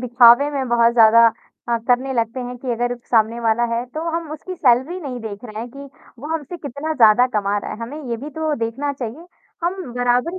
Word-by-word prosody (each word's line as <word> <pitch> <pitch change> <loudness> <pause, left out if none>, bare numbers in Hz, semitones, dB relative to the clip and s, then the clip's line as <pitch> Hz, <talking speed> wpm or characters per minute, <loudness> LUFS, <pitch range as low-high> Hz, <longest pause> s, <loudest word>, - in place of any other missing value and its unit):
दिखावे 245 +3 +5
में 270 -3 -3
बहुत 235 0 +3
ज़्यादा 230 0 +6 0.4
अ, 235 - +2
करने 255 +2 +2
लगते 230 +2 -1
हैं 250 0 -6
कि 250 +1 -5
अगर 245 +1 -1 0.2
सामने 225 0 +2
वाला 230 +1 +1
है, 235 +1 -2
तो 280 +6 -7
हम 330 -1 -4
उसकी 340 +4 -7
सैलरी 270 +4 +2
नहीं 260 -6 -6
देख 215 -1 -8
रहे 215 -2 -8
हैं, 235 - -6
कि 280 +2 -10 0.3
वो 275 - -8
हमसे 320 +2 -5
कितना 295 0 -5
ज़्यादा 235 -2 +5
कमा 200 0 0
रहा - - -6
है, - - -8
हमें 280 +7 -7
ये 235 - -1
भी 280 +6 -8
तो 315 +1 -2
देखना 275 +6 -3
चाहिए। 270 +5 -7 0.4
हम 350 +2 0 0.2
बराबरी 245 +8 0
245 Hz, 215 wpm, -20 LUFS, 230-285 Hz, 0.4 s, ज़्यादा